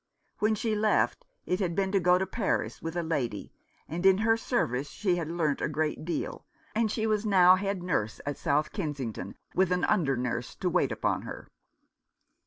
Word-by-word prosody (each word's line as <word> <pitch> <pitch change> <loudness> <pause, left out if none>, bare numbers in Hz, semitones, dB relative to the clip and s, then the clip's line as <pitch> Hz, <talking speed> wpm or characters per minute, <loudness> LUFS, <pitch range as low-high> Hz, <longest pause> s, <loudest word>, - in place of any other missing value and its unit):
When 215 +1 +2
she 220 +1 -1
left 215 - +1 0.2
it 180 - 0
had 175 -4 -1
been 190 0 0
to 195 - +3
go 180 0 +4
to 190 - 0
Paris 205 0 -2
with 165 +1 -5
a 175 - 0
lady, 135 -10 -2 0.3
and 170 +3 -4
in 190 -1 +6
her 225 +2 +3
service 145 - -1
she 185 -4 0
had 165 -3 -2
learnt 160 -4 0
a - - 0
great 155 +1 -1
deal, 175 - -3 0.3
and 225 0 +1
she 220 +1 -1
was 215 -1 +1
now 185 -4 +6
head 195 -1 -2
nurse 110 -12 -1
at 145 -1 -3
South 150 -1 +1
Kensington, 135 - -4 0.2
with 185 0 +2
an 180 0 +1
under 135 -7 +2
nurse 125 -1 -3
to - - -1
wait - - +2
upon - - 0
her. - - -8
180 Hz, 195 wpm, -29 LUFS, 150-200 Hz, 0.3 s, in